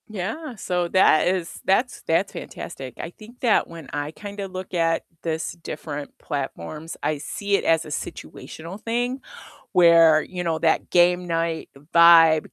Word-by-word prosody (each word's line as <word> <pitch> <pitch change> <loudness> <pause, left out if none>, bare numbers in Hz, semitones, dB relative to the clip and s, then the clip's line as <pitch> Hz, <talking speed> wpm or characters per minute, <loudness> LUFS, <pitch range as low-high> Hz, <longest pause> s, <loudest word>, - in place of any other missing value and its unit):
Yeah, 220 - -5
so 180 -3 -1
that 180 -4 +4
is 180 -2 -2
that's 240 +7 +1
that's 170 +4 0
fantastic. 130 -7 -8
I 165 - -5
think 225 +6 -15
that 235 -4 +3
when 165 -4 -10
I 145 +1 -3
kinda 200 +2 -7
look 185 0 -8
at 165 -1 +1 0.2
this 160 -1 -2
different 150 -3 -7
platforms, 150 - -5
I 155 - 0
see 200 +6 -2
it - - 0
as 165 -1 +2
a - - -9
situational 165 +5 -7
thing 245 +3 -2 0.5
where, 165 -4 +6
you 180 -1 -6
know, 165 -2 0
that 160 0 +1
game 180 0 +4
night 165 -1 -2 0.2
vibe 165 -2 +7
170 Hz, 155 wpm, -23 LUFS, 160-190 Hz, 0.5 s, vibe